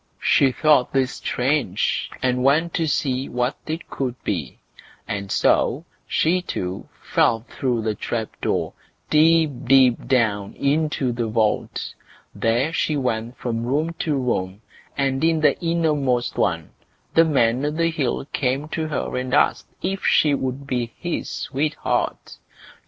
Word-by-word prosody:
She 135 -2 +4
thought 145 -1 +3
this 135 -2 +2
strange, 125 -6 -1
and 125 0 +1
went 160 +5 +3
to 165 - 0
see 135 -2 -1
what 125 +3 -1
it 160 +2 -4
could 130 -3 -3
be; 80 -10 -3 0.5
and 100 -1 -4
so - - +2 0.2
she 180 +3 +2
too 95 - -5
fell 115 - +2
through 120 -1 -2
the 110 -1 0
trap 110 +1 -3
door, - - -1 0.4
deep, 160 0 +5
deep 130 -2 +4
down, 110 -6 +1
into 145 -2 0
the 120 -1 -2
vault. 110 -1 -1 0.4
There 120 +8 0
she 155 -2 0
went 120 -2 -2
from 115 -2 -3
room 150 +7 0
to 155 -3 0
room, 105 -6 -2 0.3
and 135 0 0
in 165 -1 +3
the 150 -3 +4
innermost 150 -8 0
one 85 -5 -1 0.4
the 165 - +6
Man 130 -5 +2
o' 145 - +1
the 165 +2 0
Hill 140 -5 -1
came 135 +3 -1
to 160 0 -2
her 155 - -3
and 130 +1 -1
asked - - +2 0.2
if 195 +1 -2
she 150 -2 +4
would 135 0 -3
be 125 -4 -3
his 175 -1 -3
sweetheart? 150 +3 -2
130 Hz, 145 wpm, -22 LUFS, 120-155 Hz, 0.5 s, the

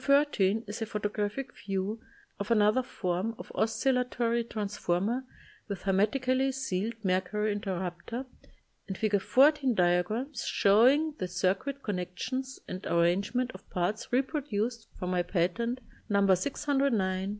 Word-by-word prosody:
13 255 -8 +3
is 210 +2 -6
a - - 0
photographic 210 +5 -3
view 195 +3 -3 0.4
of 200 - -4
another 215 +2 +4
form 195 -1 -2
of - - -9
oscillatory 235 0 +1
transformer 210 +1 -1 0.4
with 200 -4 -5
her 195 - +1
metically 255 +6 +2
sealed 230 -4 -2
mercury 190 +3 +1
interrupter, 190 +4 -4 0.6
and 190 - -4
Fig. 210 -2 +1
14 270 +1 +4
diagrams 180 +10 +1
showing 260 +10 +4
the 185 - -1
circuit 190 +10 -1
con 205 -4 -1
nections 255 +9 -4
and 185 +2 -6
arrangement 200 +9 +1
of 185 - -14
parts 185 +5 -1
repro 270 +4 +1
duced 225 +2 -2
from 180 0 -3
my 180 -1 +2
patent, 185 +8 0 0.3
No. 200 -1 +3
210 Hz, 125 wpm, -30 LUFS, 190-250 Hz, 0.6 s, another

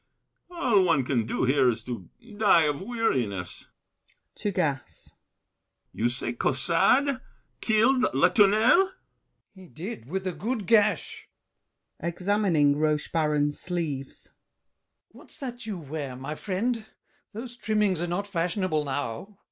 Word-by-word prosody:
[Yawning.] 345 -1 -7
All 210 -6 +4
one 140 -7 +2
Can 120 -4 0
do - - -1
here 130 0 +4
is 115 - -2
to 115 -8 -7 0.3
die 200 -6 +5
of 150 0 -1
weariness. 130 - -2 0.7
[To 205 - -2
Gassé.] 155 -8 -3 0.8
You 120 +2 0
say 120 -1 -3
Caussade 210 - +2 0.4
killed 250 +4 +3
Latournelle? 225 - +5
GASSÉ. - - -19 0.6
He 190 -2 -14
did, 160 - -8
With 190 +5 -3
a 185 - 0
good 210 +6 -3
gash! 210 -4 +2 0.7
[Examining 170 -4 +1
Rochebaron's 150 -1 0
sleeves. 160 -7 -4 0.8
What's - - -14
that 245 -4 -7
you 205 -4 -3
wear, 145 -4 -6
my 135 +4 -5
friend? 215 +6 -2 0.5
Those 235 +3 -7
trimmings 210 -6 0
are 175 - -1
not 180 +4 -2
fashionable 175 -3 -1
now. 145 - -4
175 Hz, 125 wpm, -27 LUFS, 145-215 Hz, 0.8 s, die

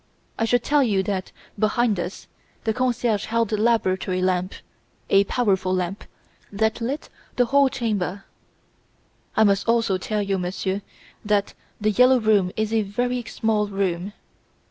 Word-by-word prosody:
I 225 - +2
should 245 +1 +2
tell 295 0 +3
you 205 -7 +2
that, 190 -1 -3 0.3
behind 215 -1 +2
us, 180 +2 -5 0.4
the 220 - 0
concierge 240 -3 0
held 230 0 0
the 215 - 0
laboratory 190 -5 +1
lamp 185 0 0 0.6
a 195 0 +5
powerful 190 -5 +1
lamp, 185 +2 -3 0.5
that 220 +3 0
lit 265 +6 -3 0.3
the 245 - +3
whole 275 +2 +4
chamber. 205 -7 -2 1.1
"'I 220 - +6
must 200 0 +2
also 230 -5 +2
tell 210 +2 -2
you, 195 -1 -1
monsieur, 190 +2 -2 0.4
that 205 -1 0 0.3
"The 215 0 +1
Yellow 250 +4 +5
Room" 210 -5 +2
is 215 0 -1
a 225 - +3
very 245 +5 -2
small 215 -2 0
room. 195 -1 -2
210 Hz, 145 wpm, -23 LUFS, 195-230 Hz, 1.1 s, I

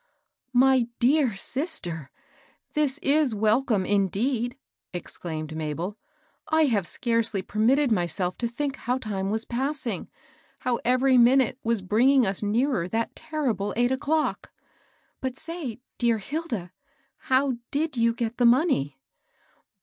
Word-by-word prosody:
" 255 - -54
My 260 -3 +3
dear 255 -2 +3
sister, 195 - -4 0.6
this 295 -3 +1
is 285 -5 +3
welcome, 215 -1 +2
indeed 225 +6 0
I - - -39 0.2
" - - -64
ex - - -8
claimed 155 -2 -5
Mabel. 160 +5 -3 0.3
" - - -39
I 315 0 +4
have 210 -10 +1
scarcely 230 -5 0
permitted 245 +7 +2
my 175 -5 +2
self 180 +2 -2
to 235 - 0
think 275 +4 -3
how 250 +2 -1
time 200 -6 -3
was 220 +2 0
passing, 255 -4 -3 0.2
— - - -33
how 245 -2 0
every 255 +1 +4
minute 250 +1 +4
was 225 -3 0
bringing 245 +7 +4
us 190 -1 -1
nearer 220 -2 +1
that 225 +4 -2
terrible 275 - -2
eight 245 +1 +3
o'clock. 300 +4 -1 0.7
But 260 -1 -3
say, 315 -8 -6 0.2
dear 235 -2 +3
Hilda, 230 - -4 0.5
how 260 -1 +1
did 305 +1 -1
you 230 -1 +3
get 230 0 -3
the 245 - +3
money 235 - +2
240 Hz, 145 wpm, -26 LUFS, 205-270 Hz, 0.7 s, I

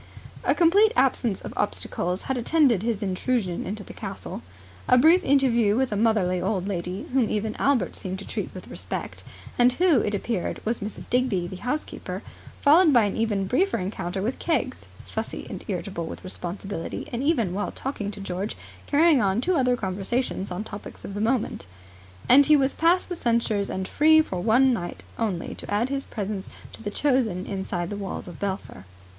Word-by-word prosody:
A - - +2
complete 395 +6 +5
absence 250 -5 +2
of - - -7
obstacles 180 -3 -1
had 265 - -2
attended 250 - +3
his 225 -2 -1
intrusion 190 -1 -1
into 205 +1 -4
the - - -11
castle. - - -6 0.5
A 250 - +6
brief 330 +8 +6
interview 240 -6 +3
with 260 0 +1
a - - 0
motherly 200 -5 +2
old 190 0 -1
lady, 180 -1 -3
whom 255 -5 +3
even 215 0 -1
Albert 260 -10 +1
seemed 190 0 -4
to 200 - -9
treat - - -4
with - - -10
respect, - - -5 0.4
and 245 +1 +6
who, 340 -3 +4
it 205 -1 0
appeared 200 -2 -2
was 230 +2 0
Mrs. 205 +1 -7
Digby, 245 -8 +1
the 180 +1 -7
house 295 +9 -2
keeper; - - -7 0.4
followed 315 +3 +6
by 240 -4 +6
an 205 - -1
even 210 -4 0
briefer 370 - +1
encounter 190 0 -3
with 240 +5 -2
Keggs 335 - -1 0.2
(fussy - - -5
and - - -7
irritable 170 -5 -3
with - - -8
responsibility, 185 -1 -5
and, 240 - -1
even 250 - +1
while 205 +2 -2
talking 240 -7 -4
to 210 - -7
George 195 +1 -4 0.3
carrying 300 -2 +5
on 195 +1 +2
two 365 +9 +1
other 250 -3 +3
conversations 195 +2 -2
on 180 +3 -4
topics 210 -1 -9
of 195 - -6
the 205 - -3
moment), 220 - 0 0.6
and 280 +2 +7
he 305 - +7
was 275 -1 +2
past 345 +3 +3
the 355 - -4
censors 230 -7 0
and 190 0 -3
free 315 +1 +5
for 185 - -1
one 245 +5 +4
night 175 -6 -5 0.2
only 200 -7 -2
to - - -8
add 220 +5 +1
his 275 0 -3
presence 200 -2 -4 0.2
to - - -9
the 205 - -3
chosen 225 -7 +1
inside 190 -2 -3
the - - -3
walls 195 -2 -5
of 175 - -9
Belpher. 190 - -4
215 Hz, 185 wpm, -25 LUFS, 190-265 Hz, 0.6 s, and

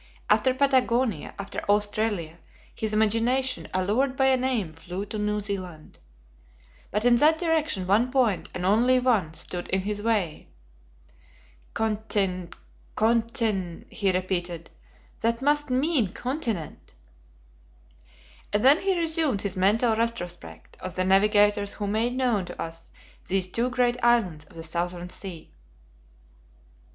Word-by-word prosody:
After 215 +5 +4
Patagonia, 255 - +1
after 200 0 -5
Australia, 205 -5 0 0.3
his 220 -1 -3
imagination, 230 +5 +1
allured 215 +9 0
by 265 - +3
a 260 - +4
name, 250 -10 -1
flew 180 +4 -6
to 210 +1 -5
New 210 0 0
Zealand. 185 -6 -6 0.9
But 210 +4 -2
in 240 -1 +6
that 310 +5 +4
direction, 315 - 0
one 215 +7 +3
point, 250 -8 +1
and 180 - -3
only 235 +6 +4
one, 220 -11 +1
stood 175 +1 -4
in 190 - 0
his 205 +1 -3
way. 205 -8 -1 1.3
"Contin 205 -5 -1 0.5
contin," 220 -6 0
he 200 -3 +1
repeated, 180 -2 -3 0.5
"that 230 +1 0
must 295 +1 +1
mean 255 - +1
continent!" 240 - -4 1.6
And 210 +3 +1
then 285 +5 +7
he 385 -1 +1
resumed 320 -9 0
his 200 -1 -2
mental 220 +5 +3
retrospect 220 -7 -4
of 185 - -7
the 185 - 0
navigators 205 +1 +3
who 210 - -4
made 220 +4 0
known 240 -7 +1
to 175 - -10
us 165 0 -7 0.4
these 190 -1 +2
two 230 +7 -1
great 245 -1 0
islands 200 -11 +2
of 165 - -19
the 165 - -7
Southern 175 +2 -2
Sea. 180 -5 -8
210 Hz, 130 wpm, -26 LUFS, 185-245 Hz, 1.6 s, then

